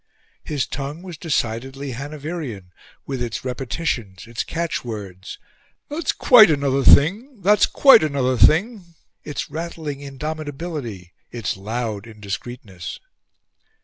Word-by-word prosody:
His 145 -4 -1
tongue 140 +5 -6
was 180 -3 -7
decidedly 135 -3 -2
Hanoverian, 140 - -6 0.3
with 135 -3 -4
its 120 0 -4
repetitions, 125 - -3
its 115 0 -4
catchwords 110 - -5 0.5
"That's 300 +1 -1
quite 230 -6 +7
another 140 -2 +1
thing! 210 - +5
That's 205 +2 +5
quite 275 - +7
another 140 -4 +1
thing!" 175 - +3 0.3
its 150 - -5
rattling 160 -3 -5
indomitability, 145 - -6 0.2
its 115 -4 -3
loud 110 +1 -4
indiscreetness. 105 -2 -7
140 Hz, 105 wpm, -22 LUFS, 115-165 Hz, 0.5 s, quite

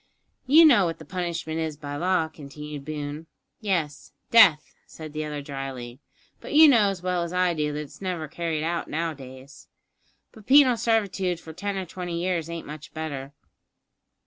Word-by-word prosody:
"You 315 +5 +8
know 240 - +6
what 165 -1 -3
the 160 - -12
punishment 170 -2 -3
is 160 -2 -3
by 145 -1 -6
law," 175 +1 +1
continued 150 -1 -9
Boone. 150 +1 -6 0.3
"Yes 165 -8 -2 0.2
death," 190 -10 +6
said 155 -2 -10
the 155 0 -3
other 150 -1 -5
drily; 135 -3 -7 0.4
"but - - -7
you 315 +1 +9
know 225 -8 +5
as 185 -3 -5
well 180 -1 0
as 170 +1 -4
I 180 -1 +2
do 150 -2 -1
that 150 - -4
it's 150 - -12
never 180 -5 -3
carried 160 -1 -3
out 170 +1 -2
nowadays." 140 -4 -6 0.6
"But 215 -2 -16
penal 265 -2 +7
servitude 200 -6 0
for 160 -1 -11
ten 200 +4 -4
or 190 - -3
twenty 175 -1 -5
years 170 -2 -1
ain't 170 -1 -6
much 150 +1 -10
better." 145 -3 -5
165 Hz, 170 wpm, -25 LUFS, 150-185 Hz, 0.6 s, you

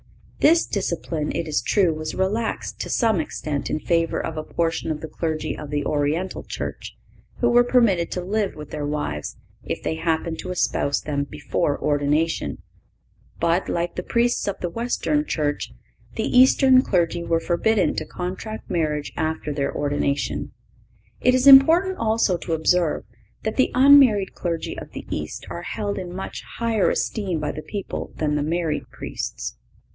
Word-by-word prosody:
This 330 +2 +5
discipline, 170 -5 -2
it 165 0 -2
is 155 - 0
true, 185 -6 +2
was 155 0 -5
relaxed 210 +5 -2
to - - -4
some 225 -6 +2
extent 150 -2 -3
in 155 - -1
favor 165 +1 +1
of 160 - -4
a 155 - -2
portion 165 0 -1
of 155 -1 -2
the 160 - -6
clergy 155 0 -3
of 150 - -8
the 145 -1 -1
Oriental 150 +5 -1
Church, - - -6 0.4
who 240 - +3
were 240 0 +6
permitted 230 -9 +3
to 180 - -3
live 200 +1 -1
with 150 -1 -9
their 150 -1 -3
wives 145 - -3 0.3
if - - -4
they 160 - -2
happened 165 0 -1
to 185 - -6
espouse 145 -5 0
them 140 -2 -2
before 145 +1 -2
ordination; 150 +3 0 0.8
but, 170 +2 +1
like 170 0 -1
the - - -3
Priests 235 +5 +1
of 200 - -2
the 175 - -2
Western 245 - 0
Church, 150 - -2 0.4
the - - -1
Eastern 260 0 +7
clergy 175 -6 0
were 165 -1 +1
forbidden 190 +5 +1
to - - 0
contract 185 +6 -6
marriage 150 -4 -1
after 155 -1 -2
their 140 -1 -1
ordination. 145 -1 -1 0.7
It 250 - +4
is 255 +1 +2
important 325 +8 +7
also 220 -5 +2
to 170 0 -4
observe 160 0 +2 0.4
that 220 - -2
the 260 - +4
unmarried 255 -7 +6
clergy 170 -2 -3
of - - -11
the - - -7
East 75 0 -4
are 170 - -5
held 205 +2 -3
in 180 -2 -6
much 190 +2 -6 0.2
higher 230 -4 +2
esteem 190 -7 -1
by 150 -1 -2
the 155 - -6
people 200 +4 -5
than 150 -1 -1
the 150 - +1
married 160 0 -1
Priests. - - -5
170 Hz, 165 wpm, -23 LUFS, 155-215 Hz, 0.8 s, Eastern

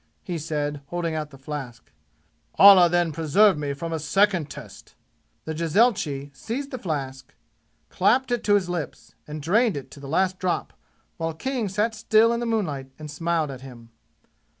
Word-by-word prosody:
he 180 - -4
said, 145 -2 -3
holding 170 0 -3
out 155 -1 -3
the 135 - -14
flask. 135 -3 -8 0.6
"Allah 195 -3 +8
then 175 -1 +1
preserve 165 +6 +4
me 145 -1 -3
from 165 +4 -5
a 160 - -2
second 185 -1 +1
test!" 120 -10 -12 0.5
The 160 - -3
jezailchi 155 - +1
seized 275 +5 -5
the 255 - -5
flask, 135 - -5 0.5
clapped 245 +7 +2
it 240 -2 0
to 205 -1 +4
his 195 -3 +1
lips 175 -4 -5
and 150 0 -7
drained 215 +4 +2
it 140 - -8
to - - -12
the 140 -1 -9
last 185 +4 +1
drop 180 -2 -2 0.4
while 165 -1 -3
King 245 +2 -2
sat 210 +4 0
still 220 +1 +3
in 235 - -1
the 240 - -3
moonlight 155 -13 -2
and 150 -1 -8
smiled 165 -1 -1
at 130 -1 -9
him. 120 -3 -12
165 Hz, 175 wpm, -24 LUFS, 145-205 Hz, 0.6 s, Allah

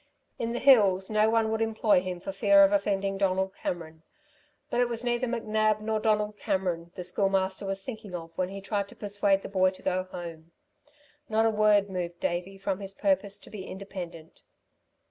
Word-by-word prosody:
In 230 0 -1
the 240 - -2
hills 205 -8 +5
no 215 0 +4
one 225 -1 +2
would 220 0 -1
employ 220 -3 +3
him 180 -1 -5
for 190 - -5
fear 200 0 +5
of 195 - +5
offending 195 -1 0
Donald 190 0 +1
Cameron. 160 -4 -5 0.7
But 245 - +2
it 245 - +2
was 235 0 -3
neither 240 +1 0
McNab, 215 -2 +1
nor 215 0 -1
Donald 210 -1 +1
Cameron, 175 -3 -2
the 180 - -5
Schoolmaster 195 +1 0
was 195 0 -3
thinking 215 -6 -7
of 165 -1 -8
when 185 -1 -1
he 195 0 -7
tried 200 0 -2
to - - -12
persuade 200 -1 0
the - - -5
boy 185 -1 +3
to 185 - -13
go 185 0 0
home. 170 -2 -9 0.8
Not 220 +1 +2
a 225 - +4
word 210 -1 +4
moved 175 -2 -4
Davey 180 +3 -2
from 195 0 -2
his 195 -1 -7
purpose 200 0 +1
to - - -14
be 205 -3 -7
independent. 180 -4 -8
195 Hz, 190 wpm, -28 LUFS, 185-215 Hz, 0.8 s, hills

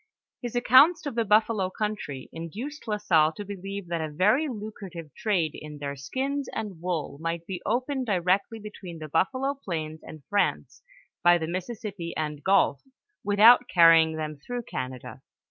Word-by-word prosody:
His 245 -2 -5
accounts 285 +8 +6
of 285 - -3
the 230 0 +1
buffalo 215 -2 +2
country, 190 -10 -4
induced 230 - -7
La 210 -1 0
Salle 165 -6 +3
to 205 +6 -7
believe 195 0 -6
that 170 -1 -1
a 155 - -3
very 210 - +2
lucrative 200 - -8
trade 185 -9 0
in 150 -1 -9
their 140 -1 -5
skins 265 - -3
and 200 -7 -5
wool 170 -5 -3
might 165 0 -3
be 185 0 -5
opened 255 +3 -1
directly 195 +3 +1
between 205 -5 -9
the 155 -1 -7
buffalo 260 - 0
plains 160 - -5
and 155 -3 -11
France 205 -1 -1 0.4
by 175 0 +6
the 160 - -3
Mississippi 185 -1 -5
and 150 -2 -3
gulf, 195 -7 +3 0.4
with 205 0 -1
out 240 +3 +8
carrying 165 -2 +6
them 155 -1 -4
through 245 +11 -5
Canada. 130 - -6
190 Hz, 165 wpm, -27 LUFS, 160-225 Hz, 0.4 s, out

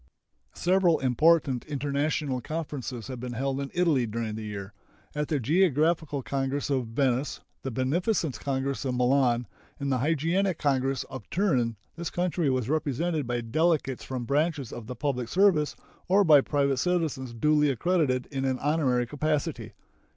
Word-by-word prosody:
Several 180 -2 +3
important 135 0 +3
international 145 -1 -1
conferences 140 -5 -5
have 130 -2 -6
been 125 0 -5
held 135 +3 -2
in 140 - -4
Italy 160 -9 +2
during 110 0 -3
the 110 - -5
year. 100 -2 -6 0.4
At 150 0 -2
the 150 - 0
Geographical 155 - +2
Congress 135 +3 -2
of 130 -4 0
Venice, 130 +3 0 0.2
the 135 - -3
Beneficence 140 - 0
Congress 135 0 -2
of 130 -2 -1
Milan, 125 -1 +2 0.3
and 140 -1 -2
the 130 - +1
Hygienic 165 +6 +1
Congress 135 -1 0
of 130 -6 -10
Turin 130 - +1 0.2
this 170 -1 -3
country 175 -3 0
was 130 -3 0
represented 155 0 -1
by 120 -1 -1
delegates 140 +2 0
from 130 -2 -4
branches 145 -1 0
of 115 -2 -8
the 125 - -5
public 125 -4 -2
service 175 - +3 0.3
or 195 +2 +5
by 150 -5 +7
private 140 -1 +1
citizens 150 -6 -1
duly 150 +4 +3
accredited 135 -2 +1
in 135 -1 -2
an 130 -1 0
honorary 135 -4 +1
capacity. 145 -5 -2
140 Hz, 150 wpm, -27 LUFS, 125-155 Hz, 0.4 s, by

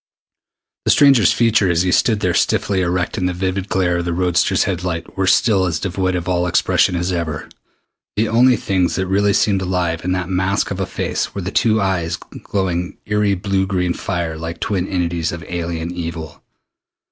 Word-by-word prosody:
The - - +1
stranger's 135 -9 +6
features 105 -7 +2
as - - +4
he 90 - +1
stood 110 +2 +2
there 90 -3 +1
stiffly 95 +2 +1
erect 90 +3 -1
in 90 - 0
the 90 - -1
vivid 95 +1 -2
glare 90 -2 +1
of 85 - -2
the 85 - -1
roadster's 90 0 +2
headlights 90 -3 -3
were 95 -1 0
still 100 -1 +3
as 80 -3 -1
devoid 95 0 -1
of 90 0 -3
all 90 -1 +1
expression 90 +1 +2
as 90 +1 -1
ever. 80 -4 -3 0.7
The 110 +2 +1
only 125 +3 +4
things 95 -3 0
that 95 - -1
really 100 +2 +2
seemed 100 -2 +2
alive 90 -3 -1
in 90 - -1
that 95 -2 -2
masque 95 +2 0
of 95 - -3
a 95 - -1
face - - -3
were 100 - -3
the 95 +2 -4
two 110 0 +2
eyes, 90 -4 0 0.3
glowing 90 -3 -2
eery 105 -1 +1
blue 95 0 -1
green 90 -2 0
fire 85 -5 -3
like 80 +1 -6
twin 95 -2 -1
entities 85 -3 -1
of 85 -2 -7
alien 85 -1 -3
evil. 80 -3 -6
90 Hz, 190 wpm, -19 LUFS, 85-95 Hz, 0.7 s, stranger's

